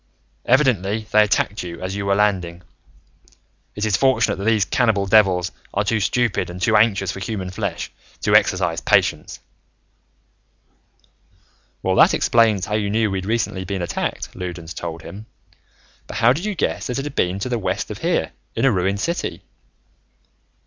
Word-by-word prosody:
Evidently, 110 -6 +2
they 105 - +6
attacked 105 0 +1
you 85 -2 -7
as 95 +1 -4
you 100 0 -3
were 100 - +3
landing. 90 -4 0 1.1
It 105 - -2
is 105 - +2
fortunate 130 -5 +2
that 100 - -5
these 110 -4 +3
cannibal 110 0 +1
devils 95 -3 +3 0.2
are 100 - +2
too 110 +1 0
stupid 115 0 0
and 90 +1 -7
too 100 +5 +2
anxious 100 -3 +3
for - - -7
human 95 -2 -4
flesh 100 -3 -4 0.3
to - - +1
exercise 90 -3 +3
patience." - - +1 2.4
"Well, - - +1
that - - +6
explains 110 -5 +3
how 105 - -5
you 105 -1 0
knew 110 +1 +1
that - - -5
we'd 95 -1 -3
recently 110 -4 -1
been 95 -1 -3
attacked," 85 - -4
Loudons 85 -2 -6
told 85 -2 -6
him. 105 +3 -10 0.8
"But - - -6
how 120 +2 +5
did 165 +8 -4
you 210 -2 -2
guess 165 - -2
that 125 - -3
it 135 - -3
had 145 - -5
been 90 -7 0
to 100 - -3
the 120 -2 -1
west 95 - -2
of - - -7
here, - - 0 0.2
in - - +1
a 135 - +5
ruined 95 0 0
city?" 170 +1 -3
100 Hz, 170 wpm, -21 LUFS, 95-115 Hz, 2.4 s, they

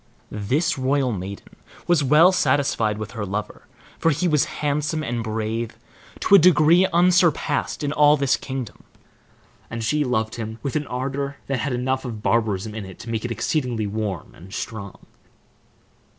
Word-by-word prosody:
This 135 - 0
royal 130 0 +1
maiden 100 -1 -7 0.3
was 175 -4 +3
well 150 +7 +6
satisfied 130 - +1
with 110 +1 -6
her 115 -4 -5
lover, 100 +2 -5 0.3
for 165 - +3
he 165 +4 +1
was 150 -4 +3 0.2
handsome 150 +2 0
and 120 -4 -2
brave 110 +1 -3 0.4
to - - +1
a 200 - +10
degree 170 +1 +5
unsurpassed 175 -4 +2
in 145 0 -1
all 150 0 +5
this 140 -1 +2
kingdom, 130 -4 -6 0.9
and 115 0 -5
she 150 +6 +1
loved 115 -4 -1
him 110 -1 -5
with 140 -1 -3
an 150 -2 -1
ardor 140 +2 -3
that 135 -2 -2
had 135 +2 -2
enough 130 +2 -1
of 115 -5 -6
barbarism 110 -3 0
in 110 -1 -5
it 95 -1 -10
to 115 - -8
make 110 -1 -2
it 120 - -3
exceedingly 120 -4 -1
warm 100 -3 -4
and 95 +4 -11
strong. 100 -4 -7
130 Hz, 165 wpm, -23 LUFS, 110-150 Hz, 0.9 s, a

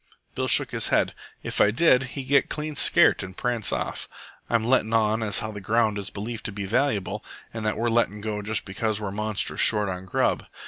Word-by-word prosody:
Bill - - -2
shook - - +2
his - - 0
head. - - +1 0.3
"If - - -1
I 105 - +6
did, 125 +3 +4 0.2
he'd 135 - -3
get 140 +2 +2
clean 150 0 -3
scairt - - +4
and 95 0 -8
prance 120 -4 -1
off. - - -4 0.4
I'm 115 -2 +1
lettin' 115 -2 +1
on 110 0 +2
as 105 -2 +1
how 110 - -4
the 105 -1 -8
ground 110 +1 +1
is 100 +1 -4
believed 110 +3 -6
to - - -3
be 100 0 -5
valuable, 110 -1 -1 0.3
an' 115 - -5
that 105 - 0
we're 115 +2 0
lettin' 115 -3 +1
go 105 0 -4
half 105 - -6
just 110 0 -2
because 105 +2 -2
we're 105 -2 -4
monstrous 105 0 -1
short 105 -2 +4
on 90 0 -5
grub. - - 0
110 Hz, 220 wpm, -25 LUFS, 105-115 Hz, 0.4 s, I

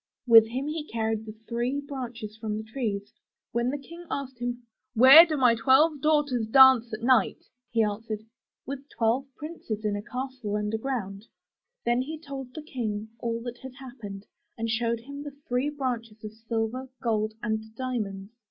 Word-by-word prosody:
With 225 -2 +8
him 255 +4 -3
he 305 0 -3
carried 220 -1 -2
the 215 - -8
three 240 +4 -1
branches 250 -6 -6
from 215 -1 -3
the 220 - -5
trees. 220 -3 -4 0.4
When 235 +1 0
the 285 - -2
King 335 +5 -12
asked 265 -3 -4
him, 245 0 -3 0.2
* 260 - -56
'Where 270 +9 +10
do 310 -2 -1
my 250 -3 +5
twelve 270 +6 +4
daughters 290 -7 +2
dance 260 -1 +7
at 215 +1 -5
night?'* 255 -1 +3 0.3
he 230 -1 +2
answered, 215 +1 -3 0.4
''With 275 +1 -6
twelve 240 +4 0
princes 265 -9 -6
in 210 -1 +1
a 205 - -3
castle 250 -2 -4
underground.'' 210 -1 -3 0.6
Then 240 +1 +2
he 310 +5 -5
told 275 -4 -8
the 310 - -6
King 220 -7 -4
all 230 0 -2
that 245 0 -6
had 260 -1 -10
happened, 230 -7 -9 0.3
and 230 0 -2
showed 230 0 0
him 280 +4 -8
the 290 -1 -8
three 250 +4 +1
branches 240 -7 -4
of 215 0 -7
silver, 225 +3 -3
gold 215 -2 0
and 220 -2 -1
diamonds. 215 -6 -4
240 Hz, 170 wpm, -27 LUFS, 220-265 Hz, 0.6 s, Where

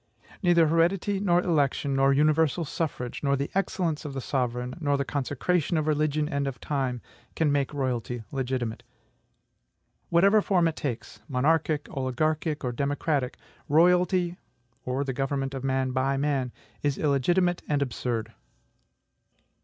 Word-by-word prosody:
Neither 175 -3 +5
heredity, 175 +5 +2
nor 175 -3 +3
election, 145 -4 +1
nor 135 0 +4
universal 155 +3 +2
suffrage, 140 -5 -3
nor 140 -1 +2
the 140 +1 -3
excellence 180 -5 -1
of 145 -3 -6
the - - -2
sovereign, 125 -1 -2
nor 145 -3 +1
the 140 - -1
consecration 145 +5 0
of 155 - 0
religion 150 0 +1
and 140 -3 -1
of 130 -4 -5
time, 130 -4 -2 0.3
can 155 -3 +2
make 140 -2 +1
royalty 125 -4 -2
legitimate. 130 -4 -2 1.3
Whatever 200 +5 +5
form 180 -4 +2
it 160 - -2
takes, 125 -6 -5
monarchic, 150 +3 +1
oligarchic, 150 +4 -1
or 125 - -1
democratic, 140 +1 -1 0.3
royalty, 180 +3 +3 0.5
or 130 +2 -1
the 135 -1 -3
government 135 0 -2
of 135 -1 -5
man 130 -1 0
by 135 +1 0
man, 135 -3 0 0.3
is 145 -3 0
illegitimate 175 +5 +2
and 145 -1 +1
absurd. 115 -3 -3
145 Hz, 140 wpm, -27 LUFS, 130-165 Hz, 1.3 s, Neither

